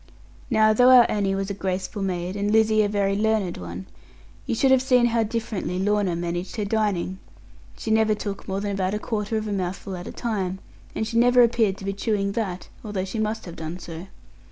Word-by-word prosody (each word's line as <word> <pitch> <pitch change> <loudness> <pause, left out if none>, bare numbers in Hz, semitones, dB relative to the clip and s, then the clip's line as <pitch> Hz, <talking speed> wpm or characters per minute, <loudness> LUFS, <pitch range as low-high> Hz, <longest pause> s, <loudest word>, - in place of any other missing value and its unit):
Now, 220 -2 +4
though 245 +3 +5
our 250 -2 +9
Annie 200 -2 0
was 195 +1 -2
a - - -2
graceful 190 +1 -3
maid, 180 -1 -2
and 205 0 -1
Lizzie 220 0 +4
a 205 - +1
very 200 -1 +1
learned 210 -3 0
one, 90 +1 -7 0.6
you - - 0
should 265 +3 +3
have 260 -1 +5
seen 250 -2 +4
how 235 -1 +2
differently 220 -4 -3
Lorna 200 -2 +1
managed 175 +1 -3
her 215 -3 -2
dining; 200 -3 -1 0.6
she 220 - -4
never 220 -1 +3
took 205 -1 -6
more 195 +1 -2
than 205 0 -2
about 195 0 -1
a - - 0
quarter 215 -1 -2
of 215 0 -3
a 205 - -2
mouthful 190 0 -3
at 175 0 -7
a - - -5
time, 195 -5 -2 0.4
and 220 - -1
she 230 +1 -2
never 245 +1 +6
appeared 225 -4 +2
to 195 - -9
be 195 - -1
chewing 200 -1 -1
that, 195 -4 -3 0.2
although 205 -4 -3
she 195 +4 -4
must 215 +1 -2
have 170 -2 -9
done 160 +2 -5
so. 170 0 -8
205 Hz, 215 wpm, -24 LUFS, 190-220 Hz, 0.6 s, our